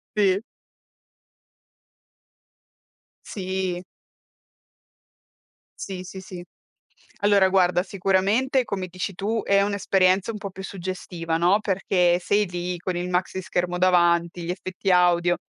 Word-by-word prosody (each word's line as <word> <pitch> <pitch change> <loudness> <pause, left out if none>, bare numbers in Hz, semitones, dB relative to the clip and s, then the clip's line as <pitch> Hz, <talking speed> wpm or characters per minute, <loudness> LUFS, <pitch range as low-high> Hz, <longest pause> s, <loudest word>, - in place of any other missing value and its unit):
Sì. 200 -1 +2 2.8
Sì. 185 -2 -3 2.0
Sì, 185 -2 -6
sì 190 +1 -8
sì. 180 -2 -9 0.8
Allora 200 -2 +4
guarda, 180 -2 +3
sicuramente 195 +8 +1
come 190 -4 -4
dici 185 +2 -5
tu 215 +4 -2
è 200 0 +3
un'esperienza 195 0 +2
un 210 - -7
po' 200 -1 -6
più 190 +1 -9
suggestiva, 180 -3 -4
no, 180 +5 +3
perché 180 -3 +1
sei 205 +3 +1
lì 175 0 -4
con 180 +1 -3
il 180 +1 -3
maxischermo 180 -1 -1
davanti, 175 -1 +2
gli 170 - -4
effetti 185 +1 -4
audio, 175 -1 +4
185 Hz, 110 wpm, -24 LUFS, 175-195 Hz, 2.8 s, Allora